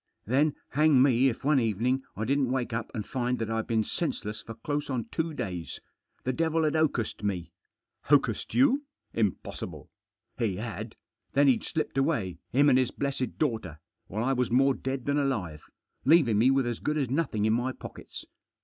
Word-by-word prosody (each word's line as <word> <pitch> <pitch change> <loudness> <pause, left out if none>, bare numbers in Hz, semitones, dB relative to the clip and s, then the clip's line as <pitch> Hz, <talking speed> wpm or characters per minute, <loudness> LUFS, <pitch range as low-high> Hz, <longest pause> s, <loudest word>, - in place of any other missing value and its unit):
" - - -48
Then 140 +6 +2
hang 150 -1 +4
me 135 -1 +4
if 120 - -6
one 145 0 +4
evening 120 +4 +1
I 110 - -2
didn't 135 0 +1
wake 125 -3 -1
up 115 0 -3
and 105 -3 -3
find 125 -1 -1
that 115 -1 -3
I'd 115 0 -1
been 110 -1 +2
senseless 110 -6 -3
for 115 - -9
close 145 +6 -3
on 125 -5 -1
two 165 0 -1
days. 90 - -5 0.4
The 130 - 0
devil 165 +3 +1
had 155 - +2
hocussed 150 -10 0
me." 90 -5 -2 0.3
" - - -27
Hocussed 135 -7 +2
you? 275 +2 +4 0.3
Impossible! 105 -5 -3
" - - -64
" - - -36
He 110 -5 0
had. 105 -1 -6 0.4
Then 140 +1 +4
he'd 130 - +3
slipped 155 -3 -2
away, 135 - 0
him 140 +4 +4
and 130 -2 +5
his 130 - +2
blessed 135 -2 -3
daughter, 110 - -2 0.3
while 110 +4 -3
I 135 +2 +2
was 125 -2 0
more 135 +3 +4
dead 130 -1 -4
than 145 +1 +1
alive, 100 - -2 0.4
leaving 135 -9 +5
me 125 +4 +5
with 135 -1 +3
as 120 -2 -2
good 150 +1 -1
as 135 -5 -1
nothing 135 -8 0
in 110 - +3
my 120 +3 0
pockets. - - -9
130 Hz, 195 wpm, -28 LUFS, 110-140 Hz, 0.4 s, and